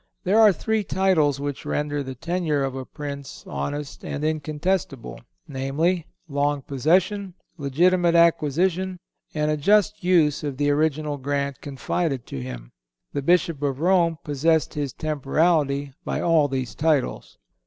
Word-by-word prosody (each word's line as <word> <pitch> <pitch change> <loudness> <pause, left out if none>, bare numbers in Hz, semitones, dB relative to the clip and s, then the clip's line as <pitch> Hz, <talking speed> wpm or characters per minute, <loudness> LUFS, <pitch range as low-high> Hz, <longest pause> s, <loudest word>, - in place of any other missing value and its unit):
There 200 +5 +3
are 215 -2 +8
three 220 +4 -1
titles 175 -8 +2
which 145 -1 -4
render 145 -1 -2
the 130 -1 -6
tenure 165 0 -1
of 135 -1 -2
a 130 0 -5
Prince 140 -2 -7
honest 145 -1 -5
and 145 - -4
incontestable, 155 -2 -2 0.3
viz., 150 +6 0 0.2
long 145 -1 0
possession, 180 +8 +1 0.2
legitimate 170 +4 +2
acquisition 170 +3 +2 0.4
and 150 0 +1
a 150 - 0
just 210 +5 +2
use 160 -6 +3
of 140 -3 -3
the 145 0 +2
original 150 0 0
grant 140 0 -2
confided 140 0 -2
to 65 - -6
him. - - -8 0.4
The 140 - -1
Bishop 165 -1 +2
of 140 -2 -1
Rome 170 -1 +3
possessed 155 +2 +1
his 145 -3 -2
temporality 145 -1 0
by - - -2
all 165 -4 +3
these 130 -4 -3
titles. 150 -4 0
150 Hz, 140 wpm, -24 LUFS, 140-170 Hz, 0.4 s, are